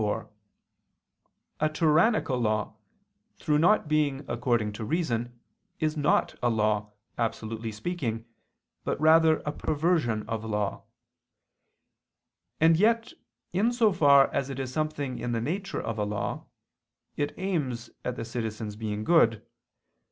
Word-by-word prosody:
4: 105 -1 -2 1.3
A 155 - +2
tyrannical 155 - +2
law, 110 -2 0 0.6
through 150 0 +1
not 180 +1 +4
being 150 -2 0
according 120 -3 0
to 110 - -6
reason, 120 -4 -2 0.4
is 155 -1 0
not 150 -1 +2
a 120 - +2
law, 105 -2 0 0.3
absolutely 115 -1 -3
speaking, 115 -2 -3 0.6
but - - -2
rather 160 0 +5
a 150 - -1
perversion 150 -9 0
of 110 -1 -3
law; 105 -2 -2 1.7
and 160 0 +5
yet 225 +4 +2 0.4
in 210 +6 +2
so 230 -4 +3
far 140 -5 +5
as 135 - -1
it 135 - -5
is 130 -1 -4
something 145 -4 -2
in 120 - -2
the 115 - 0
nature 185 - -3
of 110 -1 -4
a - - +1
law, 105 0 -3 0.7
it 145 0 -1
aims 150 -11 -2
at 125 - -3
the 115 - -5
citizens' 110 -2 -4
being 105 -1 -4
good. 115 -8 +3
130 Hz, 130 wpm, -27 LUFS, 110-160 Hz, 1.7 s, rather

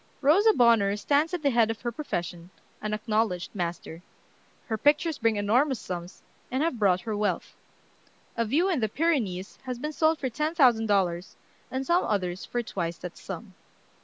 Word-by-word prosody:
Rosa 370 +11 +5
Bonheur 230 - +4
stands 285 +9 +1
at 355 -3 -3
the 280 - +3
head 230 -2 +3
of 225 0 -4
her 240 - -2
profession, 175 - -5 0.3
an 215 - -3
acknowledged 215 -4 -1
master. 170 -2 -4 0.6
Her 225 - -2
pictures 295 - +2
bring 225 -1 +2
enormous 240 +7 +2
sums, 175 -1 -7 0.3
and 260 +4 0
have 315 -8 -1
brought 185 -3 +3
her 215 +2 -3
wealth. 205 0 -2 0.8
A 230 - +1
"View 290 - +2
in 355 -7 +1
the 220 -2 0
Pyrenees" 215 - -1
has 250 -1 -4
been 300 +5 -4
sold 315 +1 +2
for 275 - -2
ten 305 +6 -2
thousand 240 -7 +4
dollars, 185 -3 0 0.3
and 260 +1 -3
some 345 +4 +3
others 185 -4 -2
for 240 0 -2
twice 170 -6 -4
that 180 -1 -8
sum. 195 +1 -8
225 Hz, 175 wpm, -27 LUFS, 195-285 Hz, 0.8 s, Rosa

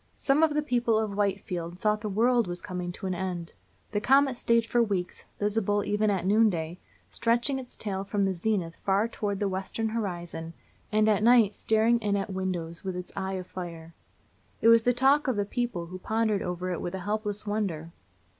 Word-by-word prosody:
Some 280 +2 +2
of 315 -2 +3
the 300 - +1
people 240 -5 +1
of 215 -2 -1
Whitefield 185 -4 -2
thought 210 +1 +1
the 210 - -3
world 235 +2 +3
was 175 0 -4
coming 180 -1 -4
to 190 - -8
an 185 - -1
end. 175 -2 -4 0.4
The 205 - -1
comet 270 +3 +4
stayed 230 -1 +2
for 240 +1 +2
weeks, 195 -5 -2
visible 205 0 +1
even 210 +1 +1
at 190 -3 0
noon 215 +3 +5
day, 170 -1 -4 0.3
stretching 240 +4 +1
its 250 -2 -10
tail 195 -2 -3
from 200 0 0
the 195 - +1
zenith 175 -2 -1
far 200 +3 +1
toward 205 -3 -3
the 205 - +1
western 195 +4 -2
horizon, 175 -6 -4 0.4
and 215 0 +3
at 210 -1 +3
night 230 -3 +5
staring 225 +3 +2
in 205 -2 0
at 195 0 -3
windows 175 -3 -3
with 190 -2 -3
its 180 0 -7
eye 190 0 -3
of 185 -1 -5
fire. 170 -3 -8 0.7
It 230 - +5
was 230 0 +7
the 245 - +3
talk 270 +4 +3
of 260 - +1
the 205 -1 0
people, 235 -6 -2
who 185 +2 -8
pondered 220 0 0
over 180 +1 -3
it 175 - -3
with 175 +2 -4
a 190 - -5
helpless 210 +1 -2
wonder. 190 -7 -2
205 Hz, 200 wpm, -28 LUFS, 185-225 Hz, 0.7 s, was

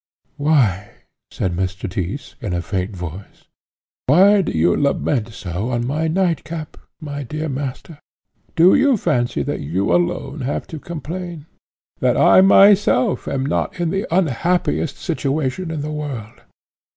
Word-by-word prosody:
"Why," 125 -10 +2 0.4
said 90 -2 -2
Mr. 95 +3 -3
Tyss, 95 +8 -5
in 105 -7 -3
a 85 -1 -2
faint 95 +1 -3
voice 90 +2 -9 0.6
"why 195 +8 +6
do - - -2
you 85 +2 +2
lament 140 -4 0
so 100 0 -5
on 120 -1 -1
my 155 +5 -1
nightcap, 165 -2 -2 0.2
my 145 -3 -6
dear 155 +4 -4
master? 140 +2 -5 0.6
Do 175 +3 +6
you 270 -2 +4
fancy 120 - 0
that - - -3
you 85 +5 -1
alone 135 - -1
have 130 +2 -2
to 160 - -5
complain? 170 0 -6 0.5
that - - +2
I - - +6
myself 195 -10 +5
am 135 -1 -1
not 145 - -2
in 170 -2 0
the 195 - -2
unhappiest 170 -2 0
situation 155 0 -2
in 160 -2 -3
the 150 +1 -4
world? 135 -8 -6
145 Hz, 140 wpm, -20 LUFS, 105-165 Hz, 0.6 s, why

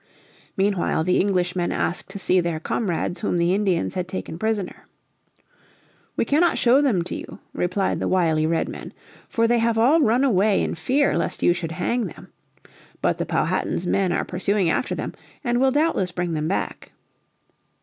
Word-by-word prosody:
Meanwhile 195 -4 +1
the 180 +2 +2
Englishmen 180 -2 0
asked 175 - -2
to 195 - -7
see 185 -1 +2
their 170 -2 -1
comrades 175 0 -2
whom 205 - -1
the 170 +1 +2
Indians 195 -4 0
had 180 -1 -3
taken 180 -3 -6
prisoner. 215 -3 -3 1.3
"We - - +1
cannot 325 +4 +3
show 255 +4 +4
them 225 -12 +2
to - - -6
you," - - -7 0.2
replied 185 +2 0
the - - -1
wily 160 -4 +2
Redmen, 165 0 -3 0.4
"for 230 0 +2
they 240 0 +3
have 230 0 +1
all 275 +9 +4
run 245 0 +3
away 210 -5 +3
in - - -2
fear 260 - +1
lest - - -2
you 175 - +5
should 170 -2 -5
hang 230 +7 -1
them. - - -12 0.7
But - - +1
the - - -2
Powhatan's 180 - 0
men 190 0 +1
are - - 0
pursuing 185 -1 0
after - - -1
them, - - -4 0.3
and 240 -1 +1
will 265 - +5
doubtless 290 - +1
bring 175 -1 -2
them 155 0 -1
back." 190 - -3
190 Hz, 170 wpm, -23 LUFS, 175-230 Hz, 1.3 s, you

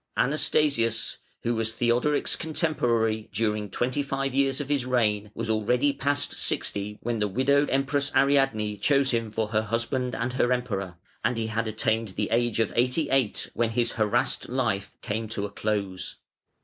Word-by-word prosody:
Anastasius, 140 -5 +1 0.3
who 120 - +1
was 110 -1 -1
Theodoric's 120 +5 +1
contemporary 120 -9 0
during 105 0 -1
twenty 125 +8 -1
five 135 -1 -2
years 135 0 +2
of 145 - -3
his 145 -3 +1
reign, 105 -5 +1
was - - -3
already 125 +6 +2
past 145 +1 0
sixty 105 +1 -1
when 120 -1 -1
the 105 - +1
widowed 140 +7 +2
Empress 140 +1 +1
Ariadne 135 -7 +2
chose 140 +5 +2
him 115 -2 -1
for 110 0 -2
her 110 0 +2
husband 120 +3 -1
and 125 - -2
her 125 -1 +2
Emperor, 100 -8 -2 0.3
and 120 +1 +1
he 115 - -1
had 110 +1 -2
attained 110 -1 -1
the 105 - -1
age 120 -1 +1
of 115 - +1
eighty 125 +6 +1
eight 135 -6 +1
when 115 -1 +1
his 120 +1 0
harassed 110 +2 +1
life 115 -6 -1
came 110 0 -3
to 105 -2 -3
a 100 - -6
close. 100 -4 -3
115 Hz, 165 wpm, -26 LUFS, 110-135 Hz, 0.3 s, years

